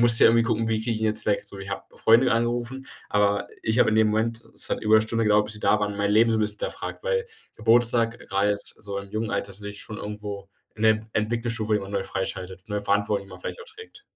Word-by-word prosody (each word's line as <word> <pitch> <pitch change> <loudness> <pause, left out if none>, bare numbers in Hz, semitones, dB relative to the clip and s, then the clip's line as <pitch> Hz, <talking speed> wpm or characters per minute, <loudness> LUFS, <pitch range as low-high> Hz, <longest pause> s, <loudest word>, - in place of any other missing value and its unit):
musste 120 -1 +7
ich - - +9
irgendwie 115 0 +4
gucken: 115 -1 0
„Wie 110 -1 +1
kriege 115 0 -1
ich 110 - -2
ihn - - 0
jetzt 110 0 -2
weg?“ 105 - +1
So, 100 - -11
ich 95 0 -8
habe 100 - -4
Freunde 120 +2 +5
angerufen, 120 +3 -1 0.2
aber 100 0 +2 0.2
ich 110 +2 0
habe - - +5
in 110 - +1
dem 110 -1 +5
Moment 115 +2 -1
es - - -6
hat - - -1
über 110 0 +4
’ne 110 - +4
Stunde 115 +1 -1
gedauert, 105 0 +4
bis 105 0 -6
sie 105 - -10
da 105 - +3
waren, 105 -1 -2
mein 100 0 0
Leben 115 +2 +5
so 110 - +2
'n - - +1
bisschen 105 -1 -2
hinterfragt. - - -4
Weil 485 -1 0 0.3
Geburtstag, 115 +1 +3
äh, - - -14
grade 100 +1 +1
so 100 0 -6
im 100 0 -9
jungen 110 +1 -2
Alter, 100 0 -2
also 100 +2 -8
sich 105 0 -6
schon 110 -2 -7
irgendwo 105 -1 -6 0.3
in 110 - -7
der 110 0 +3
Entwicklungsstufe 110 0 -1
immer 100 -1 -5
neu 100 -1 -1
freischaltet, 95 0 -5
ne? 105 -1 -2
Verantwortung, 100 0 0
die - - -17
man 95 - -10
vielleicht - - -6
auch - - -9
trägt. 440 -1 -12
110 Hz, 265 wpm, -25 LUFS, 100-115 Hz, 0.3 s, ich